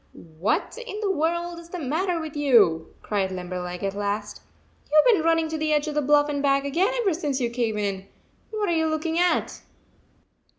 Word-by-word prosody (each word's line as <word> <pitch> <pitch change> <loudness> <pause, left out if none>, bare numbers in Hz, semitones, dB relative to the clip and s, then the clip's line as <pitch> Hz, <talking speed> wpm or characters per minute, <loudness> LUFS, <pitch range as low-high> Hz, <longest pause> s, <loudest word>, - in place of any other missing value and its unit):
" - - -37 0.3
What 210 - -1
in 425 -3 -6
the 405 -2 +1
world 340 +1 -1
is 335 0 -13
the 360 - -5
matter 335 +4 -1
with 315 -2 -6
you?" 220 - +3
cried 195 -3 -1
Limberleg, 180 0 -5
at 195 0 -1
last. 205 +1 -3 0.5
"You 305 - +6
ve - - +6
been 325 - +1
running 330 0 +2
to 315 0 -3
the 310 0 0
edge 300 0 +2
of 305 - -3
the 300 - +1
bluff 290 +1 +4
and 285 -1 -2
back 275 0 +2
again 350 - +1
ever 395 -6 +1
since 295 -5 -2
you 240 -2 -1
came 235 -3 -1
in. 195 -2 -3 0.4
What 425 -2 -2
are 340 - +1
you 320 0 +1
looking 315 +1 -1
at?" 355 0 +1
295 Hz, 210 wpm, -25 LUFS, 210-335 Hz, 0.5 s, You